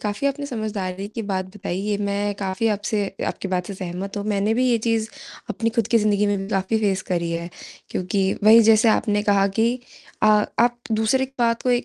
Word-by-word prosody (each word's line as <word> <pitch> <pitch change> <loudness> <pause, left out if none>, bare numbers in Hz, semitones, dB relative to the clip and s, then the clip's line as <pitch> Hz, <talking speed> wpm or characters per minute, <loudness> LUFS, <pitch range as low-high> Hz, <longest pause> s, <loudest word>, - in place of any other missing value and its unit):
काफ़ी 210 +6 -2
अपनी 280 +1 -2
समझदारी 205 -6 -4
की 225 +2 -5
बात 190 -1 -1
बताई 185 -3 -4
ये 205 +1 -1
मैं 205 0 -1
काफ़ी 190 +3 -1
आपसे 210 0 -1 0.3
आपकी 195 - -4
बात 180 -1 -1
से 200 - -6
सहमत 185 +2 -6
हूँ। 205 - -3
मैंने 205 +1 +1
भी 250 +2 +2
ये 240 - +3
चीज़ 225 -1 +1 0.4
अपनी 230 0 -1
खुद 230 - +2
की 230 - +4
ज़िन्दगी 210 -1 +2
में 205 - +1
भी 195 0 -5
काफ़ी 195 +2 0
फेस 195 -3 0
करी 170 -2 -2
है 170 +1 -3 0.4
क्योंकि 185 +2 -1 0.2
वही 225 +2 +9
जैसे 220 +1 +5
आपने 205 -1 +2
कहा 200 -1 +3
कि 235 +3 +2 0.4
आ 215 - +6 0.3
आप 240 0 +3
दूसरी 220 +5 +2
बात 230 -1 +1
को - - +4
205 Hz, 205 wpm, -22 LUFS, 195-225 Hz, 0.4 s, वही